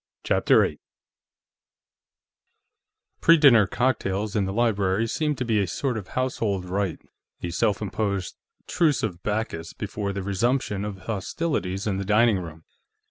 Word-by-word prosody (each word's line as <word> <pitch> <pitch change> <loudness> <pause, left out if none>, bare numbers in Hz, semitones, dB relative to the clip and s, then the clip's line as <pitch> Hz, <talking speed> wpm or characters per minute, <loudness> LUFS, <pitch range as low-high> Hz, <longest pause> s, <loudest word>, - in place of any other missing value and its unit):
CHAPTER - - +4
8 - - -5 2.4
Pre 165 0 +7
dinner 120 - +6
cocktails 105 -3 -1
in 100 -2 +2
the 95 - -3
library 105 -2 +1
seemed 150 +5 -1
to 125 - -2
be 110 -3 +2
a 100 - -1
sort 125 - -2
of 105 -4 -5
household 110 -7 -1
rite 95 -1 -2 0.5
a 85 - -2
self 105 +5 0
imposed 100 -2 -2 0.3
Truce 160 -5 +1
of 90 -5 -3
Bacchus 105 -6 -3
before 100 -1 -4
the 100 -1 -4
resumption 105 +1 0
of 100 -3 -6
hostilities 100 - -2
in 100 -3 -1
the 100 - -2
dining 105 +1 +3
room. 80 -2 -9
105 Hz, 140 wpm, -25 LUFS, 95-115 Hz, 2.4 s, Pre